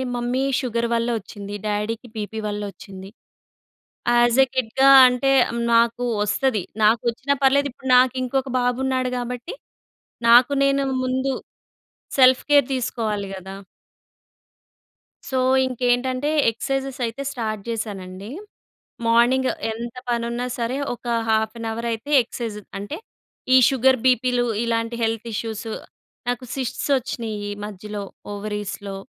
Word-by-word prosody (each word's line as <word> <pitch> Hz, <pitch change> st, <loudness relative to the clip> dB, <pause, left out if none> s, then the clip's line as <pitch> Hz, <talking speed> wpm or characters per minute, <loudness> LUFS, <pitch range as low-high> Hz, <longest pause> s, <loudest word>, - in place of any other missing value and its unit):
Mummy 245 Hz, +2 st, -1 dB, 0.2 s
sugar 235 Hz, -2 st, -1 dB
వల్ల 230 Hz, 0 st, 0 dB
వచ్చింది, 205 Hz, 0 st, -8 dB
డ్యాడీకి 210 Hz, +3 st, -2 dB
బీపీ 220 Hz, +1 st, -4 dB
వల్ల 205 Hz, 0 st, -3 dB
ఓచ్చింది. 190 Hz, 0 st, -11 dB, 1.1 s
యాస్ 240 Hz, +1 st, +4 dB
ఏ -, -, -8 dB
కిడ్‌గా 260 Hz, +2 st, +3 dB, 0.2 s
అంటే 250 Hz, +2 st, +1 dB, 0.4 s
నాకు 235 Hz, +1 st, +3 dB, 0.2 s
ఓస్తది. 210 Hz, 0 st, 0 dB, 0.2 s
నాకు 220 Hz, +2 st, +4 dB
ఓచ్చినా 275 Hz, +4 st, -1 dB
పర్లేదు 280 Hz, +1 st, +4 dB
ఇప్పుడు 265 Hz, -, -9 dB
నాకు 255 Hz, 0 st, +5 dB
ఇంకొక 265 Hz, +1 st, -1 dB
బాబు 245 Hz, 0 st, 0 dB
ఉన్నాడు 255 Hz, -1 st, 0 dB
కాబట్టి, 245 Hz, -, -5 dB, 0.7 s
నాకు 245 Hz, +4 st, +7 dB
నేను 275 Hz, 0 st, +2 dB, 0.2 s
ముందు 260 Hz, +1 st, 0 dB, 0.9 s
సెల్ఫ్ 255 Hz, 0 st, +6 dB
కేర్ 285 Hz, -3 st, +6 dB
తీసుకోవాలి 220 Hz, -5 st, -2 dB
కదా! 190 Hz, +1 st, -8 dB, 1.7 s
సో, 265 Hz, -, -1 dB, 0.3 s
ఇంకేంటంటే, 255 Hz, +2 st, 0 dB, 0.2 s
ఎక్సర్సైజెస్ 270 Hz, +3 st, -3 dB
అయితే 230 Hz, +4 st, -5 dB
స్టార్ట్ 215 Hz, -5 st, -3 dB
చేశానండి. 200 Hz, -3 st, -5 dB, 0.8 s
మార్నింగ్ 245 Hz, +3 st, +4 dB, 0.2 s
ఎంత 235 Hz, +2 st, -6 dB
పనున్నా 235 Hz, +1 st, -1 dB
సరే! 235 Hz, +3 st, -1 dB, 0.2 s
ఒక 245 Hz, -, -27 dB, 0.2 s
హాఫ్ 220 Hz, 0 st, +1 dB
అన్ 230 Hz, -, -4 dB
అవర్ 230 Hz, +1 st, -4 dB
అయితే 225 Hz, +7 st, -7 dB
ఎక్సేర్సైజ్ 225 Hz, -3 st, -6 dB
అంటే 205 Hz, +10 st, -6 dB, 0.6 s
ఈ -, -, +9 dB
షుగర్, 265 Hz, 0 st, +3 dB
బీపీలు 250 Hz, -1 st, +3 dB, 0.2 s
ఇలాంటి 230 Hz, 0 st, -1 dB
హెల్త్ 225 Hz, 0 st, -1 dB
ఇష్యూస్. 225 Hz, 0 st, -4 dB, 0.6 s
నాకు 245 Hz, +1 st, -2 dB
సిస్ట్స్ 265 Hz, +1 st, -3 dB
వచ్చినీయి 220 Hz, -4 st, -4 dB
మధ్యలో 210 Hz, 0 st, -7 dB, 0.3 s
ఓవరీస్‌లో. 205 Hz, -1 st, -5 dB
235 Hz, 120 wpm, -22 LUFS, 215-255 Hz, 1.7 s, ఈ